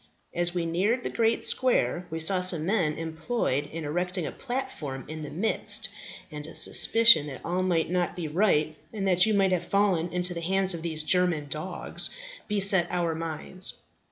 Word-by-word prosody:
As 175 Hz, 0 st, -1 dB
we 175 Hz, -1 st, -1 dB
neared 200 Hz, +9 st, 0 dB
the -, -, -3 dB
great 230 Hz, 0 st, +1 dB
square 240 Hz, -8 st, 0 dB
we 160 Hz, -, -4 dB
saw 180 Hz, +3 st, +1 dB
some 175 Hz, -4 st, -1 dB
men 175 Hz, -6 st, +1 dB
employed 160 Hz, -, -2 dB
in 160 Hz, 0 st, -7 dB
erecting 180 Hz, +3 st, -2 dB
a -, -, -4 dB
platform 245 Hz, -, -5 dB
in 155 Hz, 0 st, -7 dB
the 150 Hz, -, -6 dB
midst, 205 Hz, +7 st, 0 dB, 0.4 s
and 150 Hz, 0 st, -8 dB
a -, -, -8 dB
suspicion 225 Hz, -10 st, +5 dB
that 135 Hz, -3 st, -8 dB
all 180 Hz, +2 st, -1 dB
might 175 Hz, -3 st, 0 dB
not 180 Hz, -1 st, -1 dB
be 175 Hz, -3 st, -4 dB
right, 155 Hz, -2 st, +1 dB, 0.2 s
and 200 Hz, -3 st, -3 dB
that 185 Hz, +1 st, +4 dB
you 215 Hz, -, +2 dB
might 195 Hz, -1 st, +3 dB
have 175 Hz, -1 st, 0 dB
fallen 190 Hz, -4 st, +1 dB
into 180 Hz, 0 st, 0 dB
the 170 Hz, -, -5 dB
hands 190 Hz, +2 st, +2 dB
of 170 Hz, -, -5 dB
these 160 Hz, -2 st, -4 dB
German 170 Hz, -4 st, +2 dB
dogs, 155 Hz, +6 st, -3 dB, 0.4 s
beset 195 Hz, -4 st, +4 dB
our 175 Hz, -2 st, -1 dB
minds. 165 Hz, +3 st, -3 dB
175 Hz, 185 wpm, -27 LUFS, 160-195 Hz, 0.4 s, suspicion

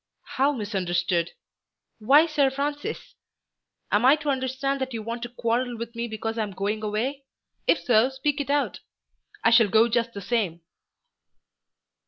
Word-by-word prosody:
"How 275 Hz, +3 st, +4 dB
misunderstood? 180 Hz, -, -1 dB, 0.7 s
Why 275 Hz, +9 st, +6 dB
Sir 295 Hz, -4 st, +2 dB
Francis? 285 Hz, +2 st, -4 dB, 0.8 s
Am 205 Hz, +3 st, +3 dB
I 265 Hz, +3 st, +7 dB
to 300 Hz, -1 st, -4 dB
understand 265 Hz, +1 st, -2 dB
that 260 Hz, -2 st, -3 dB
you 220 Hz, -, -4 dB
want 230 Hz, +2 st, -5 dB
to 240 Hz, -, -5 dB
quarrel 240 Hz, 0 st, -1 dB
with 235 Hz, +1 st, -7 dB
me 235 Hz, 0 st, -3 dB
because 225 Hz, +1 st, -4 dB
I -, -, +2 dB
am 205 Hz, -2 st, -4 dB
going 205 Hz, +3 st, -2 dB
away? 230 Hz, +7 st, -2 dB, 0.4 s
If -, -, +3 dB
so 240 Hz, +1 st, +4 dB
speak 280 Hz, +2 st, -1 dB
it 280 Hz, -, -6 dB
out. 285 Hz, 0 st, 0 dB, 0.6 s
I 230 Hz, -, +5 dB
shall 230 Hz, -3 st, +6 dB
go 220 Hz, +3 st, +5 dB
just 235 Hz, 0 st, 0 dB
the 200 Hz, -, -6 dB
same." 190 Hz, -5 st, -1 dB
235 Hz, 160 wpm, -25 LUFS, 215-270 Hz, 0.8 s, I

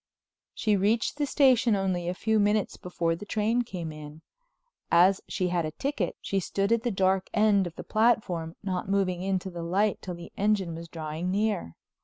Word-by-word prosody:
She 215 Hz, -2 st, +2 dB
reached 210 Hz, +7 st, +1 dB
the 290 Hz, -1 st, 0 dB
station 255 Hz, -6 st, +4 dB
only 185 Hz, -3 st, -1 dB
a 180 Hz, -, -3 dB
few 220 Hz, +2 st, +1 dB
minutes 210 Hz, 0 st, +1 dB
before 170 Hz, -2 st, -2 dB
the 180 Hz, -, -9 dB
train 220 Hz, +3 st, 0 dB
came 180 Hz, -8 st, -5 dB
in. 155 Hz, +1 st, -10 dB, 0.7 s
As 185 Hz, +3 st, +5 dB
she 185 Hz, -2 st, -1 dB
had 175 Hz, -1 st, 0 dB
a 155 Hz, -, -2 dB
ticket, 215 Hz, -, -2 dB
she 195 Hz, -, -1 dB
stood 195 Hz, +3 st, -1 dB
at 230 Hz, -1 st, +3 dB
the 240 Hz, -, -1 dB
dark 190 Hz, -2 st, +1 dB
end 210 Hz, -3 st, +4 dB
of 170 Hz, -, -10 dB
the -, -, -7 dB
platform, 210 Hz, -8 st, +1 dB
not 190 Hz, -1 st, -3 dB
moving 190 Hz, -3 st, +1 dB
into 190 Hz, 0 st, -2 dB
the 170 Hz, -1 st, -6 dB
light 195 Hz, +5 st, 0 dB
till 180 Hz, -2 st, -5 dB
the 170 Hz, 0 st, -10 dB
engine 200 Hz, -4 st, +1 dB
was 165 Hz, +1 st, -7 dB
drawing 160 Hz, +1 st, -4 dB
near. 200 Hz, -, -1 dB
190 Hz, 190 wpm, -27 LUFS, 175-215 Hz, 0.7 s, As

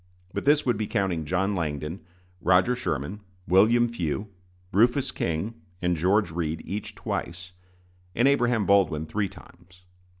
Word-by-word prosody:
But 100 Hz, -, -3 dB
this 145 Hz, +1 st, +4 dB
would 120 Hz, -4 st, +2 dB
be 110 Hz, -1 st, -2 dB
counting 95 Hz, -7 st, -1 dB
John 95 Hz, +5 st, 0 dB
Langdon, 80 Hz, -1 st, -3 dB, 0.4 s
Roger 90 Hz, +7 st, +4 dB
Sherman, 95 Hz, -, -3 dB, 0.3 s
William 110 Hz, +6 st, +5 dB
Few, 100 Hz, -3 st, -3 dB, 0.5 s
Rufus 120 Hz, +6 st, +3 dB
King, 100 Hz, +8 st, -3 dB, 0.2 s
and 90 Hz, -1 st, +1 dB
George 95 Hz, +3 st, +2 dB
Read 80 Hz, -1 st, -3 dB
each 105 Hz, +1 st, -5 dB
twice, 90 Hz, -4 st, -5 dB, 0.6 s
and 120 Hz, +4 st, +4 dB
Abraham 120 Hz, -6 st, +2 dB
Baldwin 90 Hz, -6 st, +3 dB
three 100 Hz, +4 st, -2 dB
times. 90 Hz, -1 st, -17 dB
95 Hz, 135 wpm, -26 LUFS, 85-110 Hz, 0.6 s, William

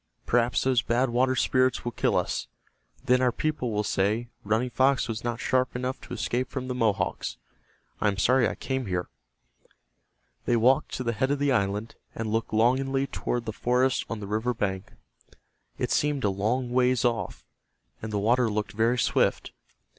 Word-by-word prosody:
Perhaps 120 Hz, 0 st, +2 dB
those 130 Hz, -3 st, +3 dB
Bad 120 Hz, +2 st, +1 dB
Water 130 Hz, +2 st, +2 dB
Spirits 130 Hz, 0 st, +2 dB
will 120 Hz, -, -1 dB
kill -, -, 0 dB
us. -, -, -1 dB, 0.6 s
Then 125 Hz, -1 st, +4 dB
our 125 Hz, -1 st, +3 dB
people 150 Hz, -1 st, -2 dB
will 105 Hz, 0 st, 0 dB
say, 105 Hz, +4 st, 0 dB
'Running 110 Hz, +4 st, 0 dB
Fox 130 Hz, +1 st, +2 dB
was 115 Hz, -1 st, -4 dB
not 120 Hz, -1 st, -2 dB
sharp 130 Hz, 0 st, 0 dB
enough 125 Hz, +1 st, -3 dB
to -, -, -9 dB
escape 120 Hz, +3 st, -1 dB
from 130 Hz, -2 st, -5 dB
the 130 Hz, -, -2 dB
Mohawks.' 115 Hz, -5 st, -1 dB, 0.6 s
I -, -, +1 dB
am 100 Hz, -1 st, 0 dB
sorry 125 Hz, +3 st, +3 dB
I -, -, -5 dB
came 130 Hz, -3 st, -3 dB
here." 90 Hz, -1 st, -2 dB, 1.4 s
They 120 Hz, -, +2 dB
walked 125 Hz, +4 st, +3 dB
to 130 Hz, -, -3 dB
the 115 Hz, -1 st, -1 dB
head 130 Hz, +5 st, 0 dB
of 145 Hz, -, +1 dB
the 145 Hz, 0 st, +1 dB
island, 105 Hz, -1 st, 0 dB, 0.2 s
and 110 Hz, -1 st, -3 dB
looked 115 Hz, +1 st, -1 dB
longingly 135 Hz, +4 st, +2 dB
toward 120 Hz, -3 st, -3 dB
the 110 Hz, -, -4 dB
forest 125 Hz, +3 st, +1 dB
on 115 Hz, -, -4 dB
the 105 Hz, -, -6 dB
river 110 Hz, +4 st, -1 dB
bank. 95 Hz, -2 st, -3 dB, 0.9 s
It -, -, -2 dB
seemed 145 Hz, -2 st, +1 dB
a 100 Hz, -, +2 dB
long 120 Hz, +6 st, -1 dB
ways 125 Hz, -1 st, +2 dB
off, 120 Hz, -2 st, -2 dB, 0.6 s
and 110 Hz, -, -5 dB
the 105 Hz, -, -1 dB
water 120 Hz, +4 st, +2 dB
looked 105 Hz, 0 st, -2 dB
very 115 Hz, +3 st, +1 dB
swift. -, -, +1 dB
120 Hz, 180 wpm, -27 LUFS, 110-130 Hz, 1.4 s, Then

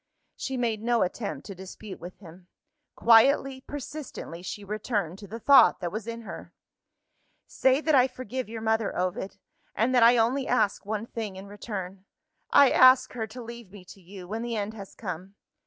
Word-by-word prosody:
She 265 Hz, -1 st, -4 dB
made 230 Hz, -3 st, -1 dB
no 235 Hz, 0 st, +2 dB
attempt 200 Hz, +3 st, -4 dB
to 200 Hz, -, -7 dB
dispute 190 Hz, +2 st, -10 dB
with 180 Hz, +2 st, -10 dB
him. 175 Hz, -1 st, -15 dB, 0.5 s
Quietly, 260 Hz, +3 st, +4 dB
persistently, 285 Hz, -, -8 dB
she 200 Hz, +3 st, -6 dB
returned 200 Hz, -3 st, -3 dB
to 200 Hz, -, -10 dB
the 225 Hz, +4 st, -7 dB
thought 265 Hz, -7 st, +6 dB
that 175 Hz, -2 st, -4 dB
was 215 Hz, +1 st, -5 dB
in 230 Hz, 0 st, -5 dB
her. 225 Hz, -, -9 dB, 0.9 s
"Say 265 Hz, +2 st, +2 dB
that 315 Hz, -1 st, +1 dB
I 260 Hz, -2 st, +6 dB
forgive 255 Hz, -2 st, -6 dB
your 225 Hz, 0 st, -6 dB
mother, 220 Hz, -1 st, 0 dB
Ovid 185 Hz, +2 st, -3 dB, 0.4 s
and 230 Hz, +5 st, +1 dB
that 250 Hz, -, +4 dB
I 235 Hz, +1 st, +7 dB
only 250 Hz, +4 st, +1 dB
ask 205 Hz, -5 st, +1 dB
one 215 Hz, +1 st, -2 dB
thing 220 Hz, -4 st, -6 dB
in 190 Hz, +1 st, -9 dB
return. 195 Hz, -2 st, -7 dB, 0.4 s
I 280 Hz, -2 st, +6 dB
ask 255 Hz, 0 st, +6 dB
her 225 Hz, -3 st, -4 dB
to 245 Hz, +3 st, -9 dB
leave 235 Hz, -3 st, -10 dB
me 195 Hz, -3 st, -13 dB
to 195 Hz, -, -14 dB
you, 185 Hz, 0 st, -11 dB
when 220 Hz, +4 st, -4 dB
the 235 Hz, -1 st, -3 dB
end 210 Hz, 0 st, -3 dB
has 200 Hz, -3 st, -10 dB
come. 185 Hz, +4 st, -7 dB
220 Hz, 185 wpm, -27 LUFS, 195-245 Hz, 0.9 s, I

